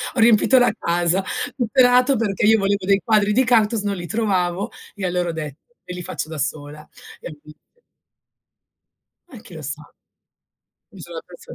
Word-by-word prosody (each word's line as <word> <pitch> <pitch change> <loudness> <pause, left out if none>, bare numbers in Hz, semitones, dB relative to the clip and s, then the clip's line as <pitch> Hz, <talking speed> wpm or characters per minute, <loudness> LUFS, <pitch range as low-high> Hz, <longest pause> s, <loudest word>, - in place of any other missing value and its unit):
Ho - - -1
riempito 230 +3 +5
la 245 - +4
casa. 175 +2 +1 0.3
Tutto 245 0 -2
è - - +9
nato 250 +2 +4
perché 210 -3 -1
io 220 0 +5
volevo 200 -1 -1
dei 200 0 +2
quadri 210 -2 +2
di 260 +4 +3
cactus, 225 -2 +2
non 200 -1 -2
li 175 -1 -7
trovavo 195 -1 -1 0.2
e 200 - -4
allora 180 -1 -1
ho - - -1
detto, 150 -2 -7 0.2
me 180 - -7
li 180 - -6
faccio 160 - -3
da 160 - -7
sola, 145 +1 -4 0.3
e - - -8
ho - - -8
inizia 150 0 -16 1.7
Eh, 245 - -12
chi 175 - -13
lo 155 - -8
sa? 145 +2 -5 1.1
Mi 195 -5 -14
sono 170 0 -8
affezio 175 +1 -12
195 Hz, 185 wpm, -21 LUFS, 170-225 Hz, 1.7 s, è